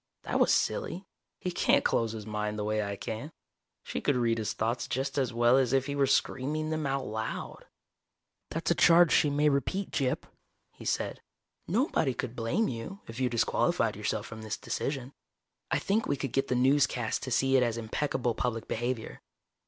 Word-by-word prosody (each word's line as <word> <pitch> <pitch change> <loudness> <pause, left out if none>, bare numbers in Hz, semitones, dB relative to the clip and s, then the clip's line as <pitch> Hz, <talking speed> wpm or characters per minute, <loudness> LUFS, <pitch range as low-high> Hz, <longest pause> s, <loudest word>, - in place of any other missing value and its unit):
That - - -1
was - - +4
silly. 190 +3 0 0.3
He 180 - -3
can't - - +3
close 115 -1 +1
his 110 -2 -6
mind 105 0 -3
the 105 - -2
way 110 +1 0
I 100 -1 -3
can. 110 +9 -5 0.5
She - - -4
could 145 - +2
read 115 -2 +1
his 110 - -2
thoughts 115 +2 -1
just 135 +2 -2
as 130 -2 0
well 120 +2 +4
as 130 -1 +1
if 135 -1 +3
he 140 - -3
were 140 -1 +3
screaming 150 +4 0
them 155 -2 -1
out 135 -1 -1
loud. 110 +1 -5 0.8
"That's - - -1
a - - +7
charge 170 0 +6
she 150 - +4
may 145 +1 +2
repeat, 150 +8 0
Gyp," 135 -4 0 0.5
he - - -13
said. - - -1 0.5
"Nobody 175 - +1
could 125 -1 -4
blame 120 - 0
you, 125 - -6
if 115 +2 -8
you 130 -1 +2
disqualified 115 -2 +1
yourself - - -2
from 110 0 -8
this 110 -1 -4
decision. 135 -1 -3 0.6
I - - +2
think 215 +3 0
we 140 - 0
could 135 -2 -3
get 135 - +1
the 125 - 0
newscasts 130 -3 +2
to - - -4
see 135 +2 +2
it 130 - +6
as 120 -2 +1
impeccable 120 +1 -1
public 115 -1 -2
behavior. 120 0 -3
130 Hz, 190 wpm, -30 LUFS, 115-145 Hz, 0.8 s, a